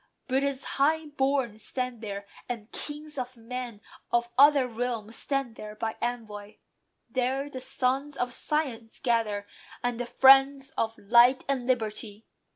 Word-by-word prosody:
Britain's 270 +1 0
high 315 +3 +1
born 270 -6 0
stand 250 +1 -3
there; 200 -2 -5 0.2
and 230 -3 -5
kings 300 -1 -4
of 250 0 -5
men 235 -2 -6 0.3
Of 240 0 +1
other 280 -1 +6
realms 230 -2 -3
stand 275 -5 -2
there 210 0 -8
by 220 0 -3
envoy. 215 -4 -4 0.5
There 260 +4 -1
The 255 - -6
sons 270 +2 -1
of 245 0 -1
science 255 -8 -2
gather, 225 -5 0 0.4
and 245 -1 -1
the 245 - -3
friends 270 +1 +6
Of 225 0 -1
light 240 +5 +5
and 260 -3 -1
liberty. 220 -3 -2
245 Hz, 140 wpm, -28 LUFS, 225-270 Hz, 0.5 s, other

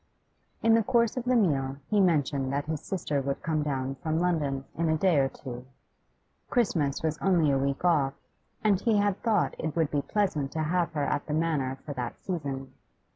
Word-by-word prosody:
In 225 - +5
the 225 - +5
course 235 +1 +2
of 250 -2 -3
the 255 0 +3
meal 140 - +1
he 205 +3 +3
mentioned 145 -6 +1
that 140 +1 -1
his 155 -1 -3
sister 150 -7 -2
would 140 +1 -3
come 160 -2 0
down 135 -2 -2
from 160 0 -1
London 150 -6 0
in 165 0 0
a 160 - +2
day 175 -3 +3
or 135 -1 +2
two. 125 -2 -9 0.8
Christmas 165 - +1
was 155 -1 -1
only 175 -6 +3
a 135 - +3
week 140 +4 -1
off, 145 -6 +3 0.5
and 205 -3 +3
he 225 -3 +2
had 205 -1 +1
thought 215 -5 +2
it 155 -1 -3
would 160 -3 +1
be 145 - +1
pleasant 155 -8 -1
to 160 0 -1
have 170 +2 0
her 150 -2 -1
at 145 0 -1
the 150 - -1
Manor 150 -5 0
for 145 - -4
that 125 -3 -5
season. 140 -7 -4
155 Hz, 200 wpm, -28 LUFS, 140-185 Hz, 0.8 s, In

